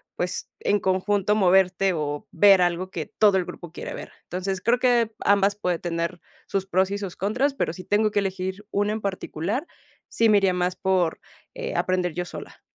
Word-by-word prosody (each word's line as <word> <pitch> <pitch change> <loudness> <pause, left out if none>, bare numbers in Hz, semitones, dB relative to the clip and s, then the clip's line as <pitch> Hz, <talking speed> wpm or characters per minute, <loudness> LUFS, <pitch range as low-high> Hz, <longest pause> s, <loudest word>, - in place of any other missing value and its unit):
pues, 180 0 -3
en 205 - +2
conjunto 195 +2 +1
moverte 190 -1 +3
o 145 -2 -3
ver 195 +1 +6
algo 175 +1 -1
que 165 -4 -4
todo 205 +4 +3
el 185 - 0
grupo 170 -1 -9
quiere - - -7
ver. - - -8
Entonces, 185 +1 -3
creo 235 +6 +2
que 240 -3 +2
ambas 200 0 +3
puede 180 -4 -1
tener 170 +1 -3 0.3
sus 195 -1 -1
pros 190 0 +1
y 200 - -2
sus 195 -3 -6
contras, 245 +9 0
pero 255 - -2
si 185 - -9
tengo 210 +2 +2
que 205 - +1
elegir 190 +1 -3
una 205 +1 +1
en 220 - -4
particular, 200 - -3 0.4
sí 230 -1 +2
me 210 - +6
iría 195 -2 +2
más 180 0 0
por, 185 -4 0 0.3
eh, - - -5
aprender 180 -2 0
yo 180 +2 -3
sola. - - -10
190 Hz, 195 wpm, -24 LUFS, 180-205 Hz, 0.4 s, ver